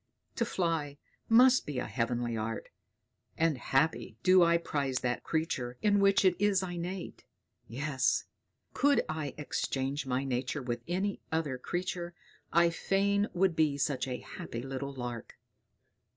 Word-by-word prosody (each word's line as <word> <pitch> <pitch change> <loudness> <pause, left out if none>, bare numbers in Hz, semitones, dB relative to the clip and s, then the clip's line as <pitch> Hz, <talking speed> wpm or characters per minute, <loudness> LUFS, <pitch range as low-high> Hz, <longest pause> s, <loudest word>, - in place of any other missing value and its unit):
To 235 - +2
fly 165 -8 -1 0.3
must 250 +3 +6
be 145 -3 -4
a - - -1
heavenly 120 -1 -1
art; 110 +1 -4 0.7
and 165 -2 +2
happy 135 -3 0
do 185 0 +6
I 170 0 +5
prize 140 -6 -2
that 120 -1 -1
creature 135 -7 -2
in 205 -1 +4
which 200 0 +4
it 185 -2 +5
is 200 -2 +3
innate. 175 +1 -5 0.4
Yes! 135 +2 0 0.5
Could 285 0 +3
I 155 -3 -4
exchange 140 -1 -2
my 130 +1 0
nature 130 +2 -2
with 120 -1 -3
any 190 +3 -1
other 150 -5 -1
creature, 175 +2 -3 0.4
I 170 +1 +4
fain 200 +4 +1
would 180 -1 +2
be 155 -3 +2
such 140 -2 0
a 125 -1 -4
happy 115 +1 -7
little 135 +1 -4
lark!" 120 -4 -6
155 Hz, 140 wpm, -31 LUFS, 130-180 Hz, 0.7 s, must